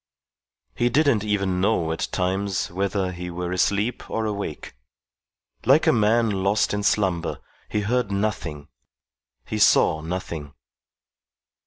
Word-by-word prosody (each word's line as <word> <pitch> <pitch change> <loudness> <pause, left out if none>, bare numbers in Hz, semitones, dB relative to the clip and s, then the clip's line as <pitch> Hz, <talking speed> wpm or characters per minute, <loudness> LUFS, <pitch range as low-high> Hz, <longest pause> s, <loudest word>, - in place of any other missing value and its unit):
He 120 - +2
didn't 140 -5 +3
even 100 -3 0
know 90 -5 +1
at 80 - -2
times 95 +1 -1
whether 95 0 -1
he 90 0 -6
were 90 0 -4
asleep 105 +5 0
or 115 - -1
awake. 100 -7 -4 0.9
Like 135 +6 +5
a - - +5
man 115 0 +3
lost 100 +2 +2
in 105 - -1
slumber, 95 -5 0 0.3
he 105 - 0
heard 115 0 0
nothing, 85 -8 -3 0.8
he - - -3
saw 80 - +4
nothing. 80 -4 -5
100 Hz, 125 wpm, -24 LUFS, 90-110 Hz, 0.9 s, Like